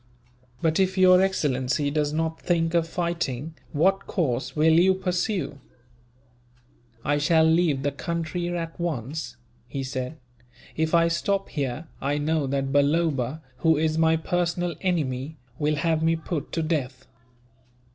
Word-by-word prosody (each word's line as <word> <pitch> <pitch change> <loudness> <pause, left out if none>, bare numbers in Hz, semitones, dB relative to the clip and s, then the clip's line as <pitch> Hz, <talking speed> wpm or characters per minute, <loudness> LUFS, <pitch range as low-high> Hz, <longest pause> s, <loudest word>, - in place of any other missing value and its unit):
"But 160 +1 +2
if 190 0 +1
your 185 0 +7
excellency 145 -6 0
does 150 -1 0
not 160 +1 -2
think 165 -1 +1
of 170 -1 +2
fighting, 165 -4 -2 0.2
what 195 +6 +2
course 130 -9 -1
will 160 +1 +4
you 185 +3 +5
pursue?" 180 -5 -2 1.5
"I 145 +1 +2
shall 160 +2 +4
leave 160 -4 +2
the 145 - +1
country, 170 +3 -3
at 170 -1 -4
once," 135 -5 -3 0.3
he 135 +1 -4
said. 130 +3 -4 0.6
"If 160 +1 +1
I 170 0 +5
stop 195 +4 0
here, 140 +1 -3 0.2
I 140 +2 0
know 150 -1 0
that 135 0 -1
Balloba, 145 -1 +1
who 160 +3 +3
is 155 +1 +1
my 160 0 +4
personal 175 +1 -1
enemy, 155 -5 -1 0.2
will 150 0 +1
have 160 +2 +1
me 165 +1 +3
put 160 -2 -4
to 165 - 0
death. 130 -5 -2
160 Hz, 140 wpm, -25 LUFS, 145-170 Hz, 1.5 s, your